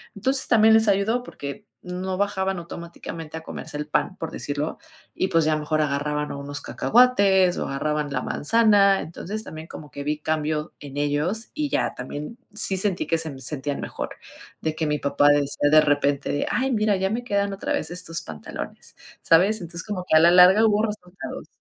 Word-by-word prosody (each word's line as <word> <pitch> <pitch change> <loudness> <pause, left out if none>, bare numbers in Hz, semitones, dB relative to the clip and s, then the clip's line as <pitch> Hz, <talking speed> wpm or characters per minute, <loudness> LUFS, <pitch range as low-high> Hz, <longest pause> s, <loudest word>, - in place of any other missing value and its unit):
Entonces, 265 +6 +2
también 220 -1 +5
les 220 -1 +4
ayudó 215 +5 +1
porque 145 - -8 0.2
no 185 +1 -4
bajaban 195 -1 -1
automáticamente 170 -2 -8
a 160 - -9
comerse 160 -2 -7
el 150 0 -4
pan, 185 +5 -1
por 165 -4 -5
decirlo, 145 +2 -4 0.3
y, 185 - 0
pues, 165 -3 +3
ya 155 - +2
mejor 155 0 0
agarraban 150 +1 -1
o 140 - -6
unos 145 +1 -5
cacahuates, 200 -7 +3
o - - -2
agarraban 150 +1 -2
la 130 -2 -1
manzana. 205 +1 +4
Entonces, 205 +6 -6
también 160 +1 -9
como 150 -2 -10
que 140 - -6
vi 150 +1 -1
cambio 155 0 -2
en 140 -1 -9
ellos 150 +10 -1
y 300 -1 -2
ya, - - 0
también, 145 - -7 0.2
sí 205 -2 0
sentí 190 -1 -1
que 165 - +2
sem 155 -4 -2
sentían 145 0 -3
mejor, - - -5 0.5
de 155 -1 -2
que 160 -1 -1
mi 150 - 0
papá 140 +1 +3
decía 145 0 +2
de 155 - +8
repente 145 -1 +1
de: 145 - 0
"Ay, 265 +2 0
mira, 215 -3 +2
ya 190 +1 0
me 240 +2 -2
quedan 200 -3 0
otra 195 - -4
vez 160 - -2
estos 175 -2 -3
pantalones", 80 -2 -8 0.3
¿sabes? 195 +7 +4
Entonces, 170 +1 -7
como 205 -4 -4
que - - +3
a - - +8
la 170 +2 +6
larga 185 +5 +7
hubo 210 -1 +3
resultados. 195 -4 -6
170 Hz, 190 wpm, -24 LUFS, 150-200 Hz, 0.5 s, de